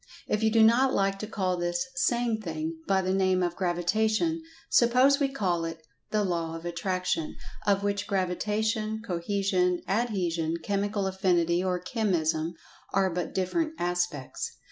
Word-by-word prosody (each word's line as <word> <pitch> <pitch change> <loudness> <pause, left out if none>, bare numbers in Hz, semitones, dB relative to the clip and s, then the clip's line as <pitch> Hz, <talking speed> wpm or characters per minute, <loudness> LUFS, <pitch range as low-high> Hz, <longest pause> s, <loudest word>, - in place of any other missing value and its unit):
If 210 - 0
you 220 - +4
do 225 0 +5
not 250 +4 +5
like 195 0 +1
to 215 - -4
call 185 -4 -1
this 175 0 -1
"same 240 -3 +1
thing" 160 -3 -4
by 190 -1 +2
the 185 +1 0
name 185 -1 +2
of 175 -1 -1
"Gravitation," 215 - +1 0.3
suppose 255 +4 +5
we 280 -2 +2
call 185 -10 0
it 165 -1 -6 0.2
"The 215 -1 +1
Law 170 -3 -1
of 165 +1 -8
Attraction," 180 -1 -2 0.3
of 200 0 +3
which 200 0 -1
Gravitation, 215 +4 -1
Cohesion, 180 -1 0
Adhesion, 180 -7 0
Chemical 205 0 -1
Affinity 180 -2 +2
or 185 -1 0
Chemism 175 -6 0 0.4
are 190 -1 +2
but 175 -1 -2
different 310 - 0
aspects. 175 -5 -2
190 Hz, 145 wpm, -28 LUFS, 175-215 Hz, 0.4 s, do